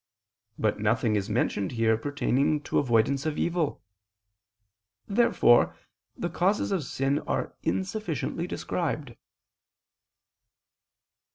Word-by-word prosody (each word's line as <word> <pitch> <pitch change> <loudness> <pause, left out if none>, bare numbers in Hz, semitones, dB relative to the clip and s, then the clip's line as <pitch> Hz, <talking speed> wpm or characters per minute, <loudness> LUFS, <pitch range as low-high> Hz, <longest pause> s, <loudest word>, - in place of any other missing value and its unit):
But 105 -1 0
nothing 110 +1 +1
is 100 0 -1
mentioned 105 -2 0
here 115 -1 +3
pertaining 140 +3 0
to - - 0
avoidance 130 +3 +2
of 155 - -2
evil. 170 -3 -1 1.2
Therefore 210 - +4 0.4
the 175 - -2
causes 180 +5 0
of 185 -5 0
sin 135 +2 0
are - - -2
insufficiently 185 - -2
described. 150 -9 -3
140 Hz, 95 wpm, -27 LUFS, 115-175 Hz, 1.2 s, Therefore